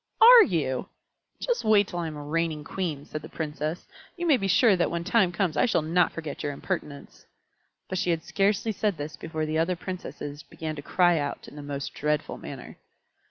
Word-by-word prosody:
"Are 475 +1 +10
you? 155 - -1 0.5
Just 485 - -1
you 220 - 0
wait 205 -2 +5
till 175 - -5
I 170 - -2
am 155 - -6
a 145 - -7
reigning 155 0 -1
Queen," 155 -4 -4
said 155 - -6
the 155 - -10
Princess. 155 +1 -4 0.3
"You 345 - -2
may 315 -4 +5
be 195 - -2
sure 200 +2 +5
that 175 - +1
when 170 0 -3
that - - -7
time 200 -6 +4
comes 170 -2 0
I 250 - +3
shall 170 - +1
not 170 +3 +2
forget 155 -3 -6
your 145 -1 -2
impertinence." 140 0 -6 0.6
But 185 - -2
she 180 - 0
had 165 -1 0
scarcely 205 +2 +1
said 205 -3 -1
this 145 +1 -5
before 155 +1 -4
the 155 +1 -1
other 175 +3 +1
Princesses 170 -5 -6
began 160 0 -6
to 145 - -6
cry 175 +2 +3
out 145 -1 -4
in - - -12
the 150 - -7
most 145 -1 -5
dreadful 150 0 -1
manner. - - -9
165 Hz, 215 wpm, -27 LUFS, 150-190 Hz, 0.6 s, Are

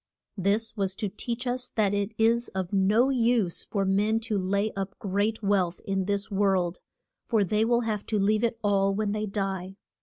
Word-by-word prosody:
This 210 +4 0
was 195 -3 0
to 205 - -3
teach 235 +5 -4
us 250 0 -2
that 205 -3 +2
it 205 +2 -1
is 230 +2 +3
of 190 0 -3
no 210 +7 +3
use 235 -7 +1
for 200 -2 -1
men 205 +3 +2
to 225 -1 -2
lay 200 +3 0
up 195 -1 -5
great 205 +3 -1
wealth 195 -3 +1
in 195 -1 -1
this 200 0 -1
world, 190 -3 +1 0.5
for 220 -4 +3
they 210 +3 +1
will 235 +1 +2
have 215 -3 -3
to 220 - 0
leave 210 +3 +2
it 230 -1 0
all 195 -1 +2
when 210 0 -1
they 215 0 -2
die. 195 -2 -3
205 Hz, 190 wpm, -27 LUFS, 195-225 Hz, 0.5 s, is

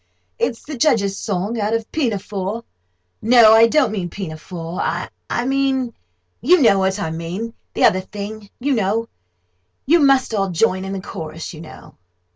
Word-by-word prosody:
It's 230 - -1
the 295 - -7
Judge's 225 -7 +2
song 205 +4 -2
out 210 +2 0
of 230 -1 -4
Pinafore—no, 205 - +1
I 225 +1 +7
don't 275 0 +2
mean 190 -5 -3
Pinafore—I 170 +4 -4
mean—you 255 - 0
know 195 -4 +5
what 190 +1 0
I 160 -5 -2
mean—the 175 +8 -5
other 185 - +5
thing, 205 +1 -8
you 280 +3 0
know. 220 0 0 0.8
You 335 +5 +5
must 275 -5 +3
all 195 -2 0
join 185 +1 +1
in 195 - -4
the 195 - -4
chorus, 165 -4 -7
you 155 - -10
know." 165 - -13
205 Hz, 140 wpm, -20 LUFS, 175-230 Hz, 0.8 s, I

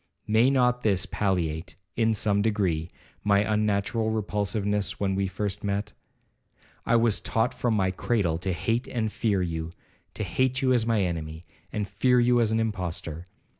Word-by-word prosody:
May 110 +4 +4
not 125 -2 +2
this 100 -4 +1
palliate, 90 -4 -2 0.2
in 110 -1 +2
some 100 -1 +2
degree, 95 -7 0 0.3
my 100 -1 +4
unnatural 105 +1 0
repulsiveness 105 -1 -1
when 95 -1 0
we 95 0 0
first 100 +1 -3
met? 100 +1 -2 0.9
I 120 - +4
was 115 -3 +3
taught 115 +2 0
from 120 -3 0
my 95 -2 +1
cradle 95 -5 0
to 95 +1 -2
hate 115 +8 -1
and 110 -3 -2
fear 100 -5 0
you,—to 85 +5 -7
hate 130 +7 0
you 130 -2 +3
as 120 -3 +2
an - - -2
enemy, 85 -5 -2 0.3
and 105 -1 -2
fear 125 +6 +2
you 120 0 +4
as 110 -2 +2
an 110 - +2
impostor. 90 -6 -3
105 Hz, 160 wpm, -26 LUFS, 95-115 Hz, 0.9 s, May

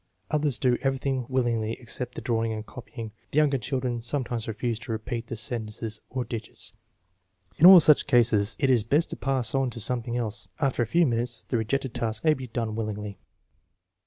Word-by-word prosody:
Others 150 -4 +1
do 125 -2 +2
everything 135 -2 -1
willingly 120 -4 0
except 125 +1 -5
the - - -5
drawing 115 -3 0
and 110 0 -5
copying. 115 -2 -8 0.2
The - - -4
younger 145 -3 +4
children 125 0 -2
sometimes 120 -2 -2
refuse 115 +1 -2
to 120 - -7
repeat 115 +1 -4
the 115 - -4
sen 115 0 -3
tences 105 0 -5
or 125 -1 -3
digits. 115 -2 -5 0.9
In 170 - +9
all 185 -1 +12
such 150 -2 +5
cases 115 -5 +3
it 135 -2 +2
is 120 -4 +4
best 145 +9 +1
to - - -3
pass 130 -4 -1
on 135 -1 +1
to 120 - -8
something 120 +1 -1
else. 115 -2 -2
After 135 -4 +1
a 120 - +1
few 170 +9 +3
TniTmt.es 120 -2 -1
the 120 - +1
rejected 125 +3 -1
task 110 -1 -2
may 155 -1 +5
be 130 -3 -6
done 115 -2 -3
willingly. 105 -2 -4
120 Hz, 190 wpm, -26 LUFS, 115-135 Hz, 0.9 s, all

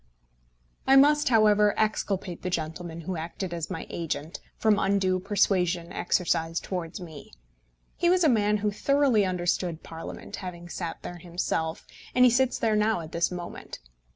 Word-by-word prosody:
I 270 - +6
must, 295 +2 +5
however, 210 -3 +4
exculpate 195 -4 -1
the 185 - -3
gentleman 165 0 -4
who 175 +2 -4
acted 170 +3 -5
as 170 -2 -4
my 185 -4 -5
agent, 165 -1 -4 0.2
from 215 -2 +3
undue 190 -2 +1
persuasion 180 -3 +1
exercised 165 -2 0
towards 180 -1 -4
me. 160 -5 -11 0.6
He 345 - +2
was 360 0 +4
a - - +6
man 210 -5 +3
who 210 - +2
thoroughly 270 -2 +2
understood 175 -2 -1
Parliament, 165 0 -8
having 175 -2 -8
sat 170 -2 -5
there 175 0 -7
himself, 170 -2 -3 0.3
and 250 0 +7
he 250 - +6
sits 260 +1 +2
there 220 -2 +1
now 210 -3 +2
at 160 0 -9
this 170 0 +1
moment. 175 -1 -7
185 Hz, 155 wpm, -27 LUFS, 170-215 Hz, 0.6 s, and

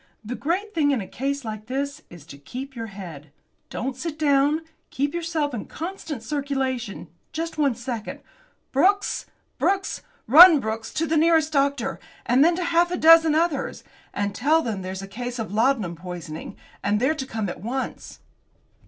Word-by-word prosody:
The 230 - -4
great 370 +11 -2
thing 300 -3 +2
in 275 -4 +2
a 195 - -6
case 275 0 -3
like 215 -1 -6
this 280 +2 -3
is 170 -4 -13
to 140 -3 -12
keep 260 - -8
your 230 -1 -5
head. 170 -8 -10 0.4
Don't 255 +2 -3
sit 310 +3 -5
down; 290 0 +3 0.3
keep 285 +2 -1
yourself 330 -4 -1
in 220 - -4
constant 320 - -6
circulation! 260 -7 -3 0.3
Just 325 0 -4
one 280 -5 +2
second! 235 -2 -5 0.5
Brooks! 390 +9 +2 0.3
Brooks! 390 0 0 0.2
Run, 320 +5 +10
Brooks, 225 -2 -4
to 325 - +1
the 320 0 +1
nearest 320 -1 +3
doctor, 280 -3 +1 0.3
and 255 +3 +4
then 335 +2 +4
to 360 - -2
half 340 +1 +3
a 355 - -2
dozen 325 -1 +7
others, 320 -3 0 0.3
and 205 0 -2
tell 310 +9 +2
them 215 -5 -3
there's 185 +1 -5
a - - -7
case 245 +5 -5
of 220 -3 -4
laudanum 220 -6 +1
poisoning, 170 -2 -8 0.3
and 205 +1 +1
they're 265 +6 +2
to 270 -4 -5
come 220 -4 -3
at 175 - -6
once." 255 +6 -5
270 Hz, 170 wpm, -24 LUFS, 220-315 Hz, 0.5 s, Run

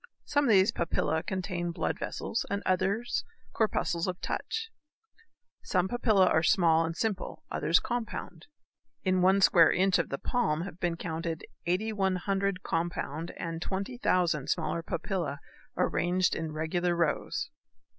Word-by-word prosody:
Some 290 0 +2
of - - +2
these 195 -2 +5
papillæ 160 -1 -1
contain 185 -2 -2
blood 170 - -2
vessels - - -2
and 200 +1 -2
others 195 +5 0 0.3
corpuscles 175 -6 0
of 180 0 -3
touch. 450 0 -3 0.9
Some 180 +1 +1
papillæ 215 -4 +3
are 160 - +3
small 165 -2 +4
and 165 +1 -3
simple, 220 -4 -2
others 165 - +3
compound. 225 -8 -5 0.6
In 185 -1 +2
one 190 +2 +4
square 170 -3 +6
inch 190 0 +3
of 170 - -1
the 140 - -2
palm 170 - 0
have 180 -2 -8
been 170 -1 -1
counted 165 -1 -4 0.2
8,100 195 0 0
compound 165 -1 -2
and 165 -1 -4
20,000 185 - 0
smaller 165 0 0
papillæ 165 -3 -3 0.4
arranged 180 +1 +1
in 160 -1 -3
regular 170 +3 0
rows. 170 -3 -1
180 Hz, 135 wpm, -29 LUFS, 165-195 Hz, 0.9 s, square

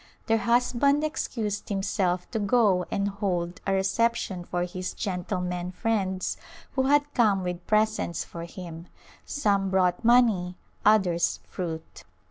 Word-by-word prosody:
Their 225 -1 +2
husband 245 +6 +2
excused 225 -9 -3
himself 195 -3 0
to 225 - -1
go 200 -4 +3
and 200 0 0
hold 180 -4 -2
a 195 - +2
reception 195 -1 0
for 175 0 -2
his 180 +1 -5
gentlemen 180 -2 -3
friends 190 -4 -1 0.3
who 265 -1 +1
had 290 +1 +3
come 205 -6 +3
with 180 -1 -4
presents 215 -5 +1
for 170 0 -7
him; 170 -1 -9 0.4
some 200 -8 +1
brought 185 +2 +2
money, 225 -7 +4 0.3
others 180 -5 +3
fruit. 165 -3 -6
195 Hz, 125 wpm, -27 LUFS, 180-225 Hz, 0.4 s, money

